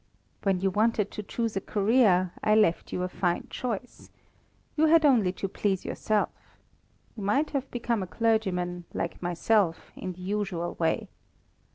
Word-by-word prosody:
When 195 Hz, -2 st, +1 dB
you 195 Hz, 0 st, +2 dB
wanted 210 Hz, 0 st, +1 dB
to -, -, -5 dB
choose 225 Hz, +1 st, -3 dB
a 195 Hz, -, 0 dB
career, 200 Hz, -4 st, +3 dB
I 215 Hz, -, +4 dB
left 210 Hz, -6 st, +2 dB
you 180 Hz, -, -2 dB
a -, -, 0 dB
fine 180 Hz, -1 st, -1 dB
choice. 245 Hz, -1 st, -5 dB, 0.7 s
You 315 Hz, +1 st, +4 dB
had 320 Hz, 0 st, +5 dB
only 230 Hz, -10 st, +4 dB
to 195 Hz, -, -3 dB
please 195 Hz, -1 st, -1 dB
yourself. 215 Hz, -1 st, 0 dB, 0.9 s
You 220 Hz, -, -7 dB
might 210 Hz, +10 st, +1 dB
have 275 Hz, -2 st, -2 dB
become 235 Hz, -2 st, -1 dB
a 185 Hz, -, -4 dB
clergyman, 180 Hz, -3 st, 0 dB
like 170 Hz, -, -3 dB
myself, 175 Hz, +1 st, +1 dB
in 185 Hz, -1 st, -5 dB
the 180 Hz, -, -13 dB
usual 185 Hz, -3 st, -2 dB
way. 165 Hz, -1 st, 0 dB
200 Hz, 160 wpm, -28 LUFS, 180-225 Hz, 0.9 s, had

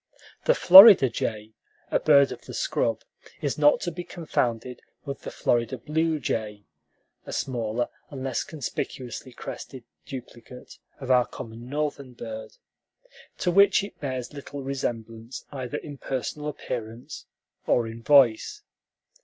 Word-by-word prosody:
The -, -, +4 dB
Florida 190 Hz, -, +10 dB
jay, 110 Hz, -1 st, -4 dB, 0.4 s
a -, -, +2 dB
bird 140 Hz, -2 st, +5 dB
of -, -, -8 dB
the -, -, -8 dB
scrub, -, -, -1 dB, 0.4 s
is 145 Hz, 0 st, -2 dB
not 145 Hz, 0 st, +5 dB
to 175 Hz, -, -2 dB
be 175 Hz, +1 st, -6 dB
confounded 125 Hz, -9 st, -3 dB, 0.2 s
with 140 Hz, -1 st, -6 dB
the -, -, -6 dB
Florida 120 Hz, +2 st, 0 dB
blue 155 Hz, +5 st, -1 dB
jay 105 Hz, -5 st, -3 dB, 0.6 s
(a -, -, -6 dB
smaller 120 Hz, -2 st, -2 dB, 0.2 s
and 135 Hz, -2 st, -7 dB
less 135 Hz, -2 st, -1 dB
conspicuously 130 Hz, -3 st, -6 dB
crested 125 Hz, +1 st, -9 dB, 0.2 s
duplicate 125 Hz, -1 st, -10 dB, 0.2 s
of 130 Hz, -2 st, -3 dB
our 125 Hz, -1 st, +4 dB
common 120 Hz, 0 st, -9 dB
Northern 140 Hz, -3 st, -3 dB
bird), 110 Hz, -2 st, -8 dB, 0.8 s
to 180 Hz, -, 0 dB
which 200 Hz, +1 st, +5 dB
it 200 Hz, -, -9 dB
bears 130 Hz, -2 st, -4 dB
little 140 Hz, -1 st, -8 dB
resemblance 115 Hz, -3 st, -5 dB
either 135 Hz, 0 st, -5 dB
in 145 Hz, -3 st, -9 dB
personal 140 Hz, +3 st, -4 dB
appearance 120 Hz, -5 st, -6 dB, 0.4 s
or 120 Hz, -, +2 dB
in 115 Hz, +1 st, -8 dB
voice. 140 Hz, -, +4 dB
130 Hz, 135 wpm, -26 LUFS, 115-150 Hz, 0.8 s, Florida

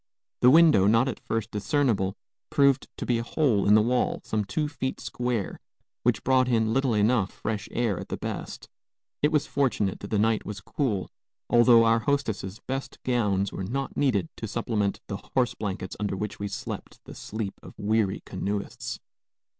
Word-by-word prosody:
The 125 Hz, -, +6 dB
window, 155 Hz, -, +6 dB
not 115 Hz, +4 st, +4 dB
at 130 Hz, -, -3 dB
first 115 Hz, 0 st, -3 dB
discernible, 105 Hz, -4 st, +1 dB, 0.3 s
proved 140 Hz, -2 st, +3 dB
to -, -, -4 dB
be 120 Hz, -2 st, +1 dB
a -, -, -2 dB
hole 120 Hz, -7 st, +1 dB
in 105 Hz, -, +7 dB
the 110 Hz, -, +5 dB
wall, 125 Hz, +2 st, +1 dB
some 110 Hz, -1 st, -1 dB
two 110 Hz, +10 st, -1 dB
feet 130 Hz, -3 st, -4 dB
square, 120 Hz, -5 st, -3 dB, 0.4 s
which -, -, +1 dB
brought 130 Hz, -1 st, +3 dB
in 110 Hz, -2 st, +2 dB
little 130 Hz, -3 st, +2 dB
enough 105 Hz, -1 st, +2 dB
fresh 105 Hz, -1 st, -4 dB
air, 115 Hz, -6 st, 0 dB
at -, -, -8 dB
the -, -, -3 dB
best. -, -, -6 dB, 0.5 s
It 150 Hz, -, +3 dB
was 150 Hz, -2 st, +2 dB
fortunate 120 Hz, -8 st, 0 dB
that 100 Hz, -, -7 dB
the 105 Hz, -, +1 dB
night 110 Hz, +1 st, +2 dB
was 105 Hz, -1 st, -6 dB
cool, 105 Hz, -3 st, -2 dB, 0.4 s
although 120 Hz, -1 st, +7 dB
our 115 Hz, 0 st, +4 dB
hostess's 110 Hz, -7 st, -2 dB
best 135 Hz, +1 st, -4 dB
gowns 105 Hz, -6 st, +1 dB
were -, -, -4 dB
not 135 Hz, +8 st, -3 dB
needed 105 Hz, -, +1 dB
to -, -, -4 dB
supplement 105 Hz, -3 st, -1 dB
the 100 Hz, -, -3 dB, 0.2 s
horse 125 Hz, -2 st, +2 dB
blankets 95 Hz, -3 st, -4 dB
under 100 Hz, -2 st, -2 dB
which 105 Hz, +1 st, -4 dB
we 100 Hz, -, -2 dB
slept 100 Hz, -, -6 dB
the -, -, -10 dB
sleep 105 Hz, -2 st, -5 dB
of -, -, -13 dB
weary 105 Hz, -2 st, 0 dB
canoeists. 100 Hz, 0 st, -4 dB
110 Hz, 180 wpm, -27 LUFS, 100-130 Hz, 0.5 s, in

